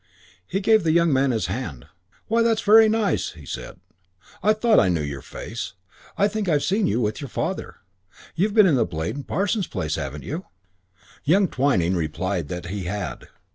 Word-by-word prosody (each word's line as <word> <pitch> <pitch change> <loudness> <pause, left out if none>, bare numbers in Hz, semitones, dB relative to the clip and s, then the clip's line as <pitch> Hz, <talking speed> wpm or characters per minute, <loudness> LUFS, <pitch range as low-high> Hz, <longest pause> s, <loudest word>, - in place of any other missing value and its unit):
He 195 - -2
gave 220 0 +4
the 160 -1 +2
young 170 -2 +3
man 135 +1 +3
his 110 -7 0
hand. 85 - -5 0.4
"Why, 230 +1 +2
that's 230 -1 +2
very 220 +1 +7
nice," 215 -2 0
he 80 -4 -13
said. - - -7 0.6
"I 210 - +4
thought 215 0 +4
I - - +3
knew 85 -4 0
your 70 -2 -5
face. 115 - -7 0.4
I 200 - +4
think 210 -2 -2
I've 150 -3 +2
seen 205 +2 +1
you 110 - +1
with 110 +1 -1
your 140 - -5
father. - - -3 0.6
You've 200 +5 0
been 215 -2 +7
in 140 -10 +4
Blade 80 +3 -4
and 145 - -7
Parson's 200 0 0
place, 75 -1 -3
haven't 70 -1 -5
you?" 155 - -5 0.8
Young 185 +6 +4
Twyning 110 - +1
replied 85 +1 -2
that 90 +2 -5
he 95 +1 -4
had. 100 +1 -4
135 Hz, 185 wpm, -23 LUFS, -, 0.8 s, very